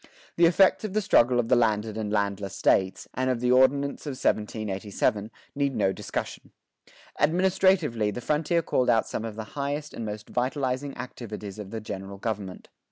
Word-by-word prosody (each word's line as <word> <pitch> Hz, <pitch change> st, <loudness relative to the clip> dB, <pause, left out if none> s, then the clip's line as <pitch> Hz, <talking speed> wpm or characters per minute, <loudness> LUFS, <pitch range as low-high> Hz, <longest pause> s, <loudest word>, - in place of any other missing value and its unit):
The 170 Hz, 0 st, +6 dB
effects 190 Hz, +5 st, +4 dB
of 210 Hz, -3 st, -4 dB
the 215 Hz, -, +2 dB
struggle 125 Hz, -8 st, +4 dB
of 115 Hz, -, 0 dB
the 125 Hz, -, +4 dB
landed 110 Hz, -2 st, +1 dB
and 110 Hz, -2 st, -3 dB
the -, -, +1 dB
landless 100 Hz, -1 st, -1 dB
States, 95 Hz, 0 st, +1 dB
and 130 Hz, 0 st, 0 dB
of 125 Hz, -2 st, 0 dB
the 125 Hz, +1 st, +1 dB
Ordinance 140 Hz, +3 st, +3 dB
of 145 Hz, -, -2 dB
1787, 105 Hz, -1 st, -1 dB, 0.2 s
need 140 Hz, -1 st, 0 dB
no 95 Hz, -, +2 dB
discussion.[25:2] -, -, -8 dB, 0.3 s
Administratively 175 Hz, -, +3 dB
the 105 Hz, -, -4 dB
frontier 155 Hz, +6 st, 0 dB
called 125 Hz, -4 st, +1 dB
out 110 Hz, -1 st, +4 dB
some -, -, -4 dB
of 110 Hz, -2 st, -5 dB
the 110 Hz, -, -5 dB
highest 145 Hz, +1 st, -3 dB
and 115 Hz, -, -5 dB
most 105 Hz, -1 st, -6 dB
vitalizing 130 Hz, +2 st, -2 dB
activities 110 Hz, -5 st, -7 dB
of 100 Hz, -2 st, -7 dB
the 110 Hz, +1 st, -5 dB
general 100 Hz, -1 st, -7 dB
government. 100 Hz, -3 st, -5 dB
120 Hz, 175 wpm, -26 LUFS, 105-140 Hz, 0.3 s, The